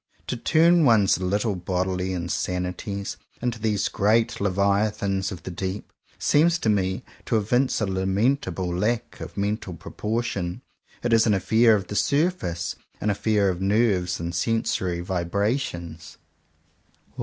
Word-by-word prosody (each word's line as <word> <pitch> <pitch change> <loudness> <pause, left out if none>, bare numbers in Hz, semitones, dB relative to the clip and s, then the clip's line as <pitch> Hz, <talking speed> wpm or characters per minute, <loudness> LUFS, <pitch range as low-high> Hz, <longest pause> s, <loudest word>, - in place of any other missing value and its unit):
To - - -3
turn 165 +6 +4
one's 110 -9 +4
little 100 +3 0
bodily 90 +1 -2
insanities 90 +2 -3 0.2
into 120 -2 -2
these 105 -2 0
great 110 +2 +1
Leviathans 100 0 +1
of 85 -3 -8
the 95 - -6
Deep, 95 +3 -5 0.2
seems 165 +3 +3
to 115 - -1
me 95 +2 0 0.2
to 115 - +1
evince 125 +5 +1
a - - +2
lamentable 95 -1 0
lack 115 +5 -1
of - - -8
mental 100 -2 -2
propor 110 +7 -3
tion. 90 -6 -4 0.4
It 120 -1 +1
is 115 0 +5
an 105 - +4
affair 110 +4 +4
of 100 -3 -2
the 105 - -6
surface 140 - 0
— - - -36
an 105 - +1
affair 105 -1 +2
of 90 0 -3
nerves 95 -3 +1
and 85 +1 -4
sensory 90 -2 0
vibrations. 85 - -2
100 Hz, 140 wpm, -25 LUFS, 90-115 Hz, 0.4 s, is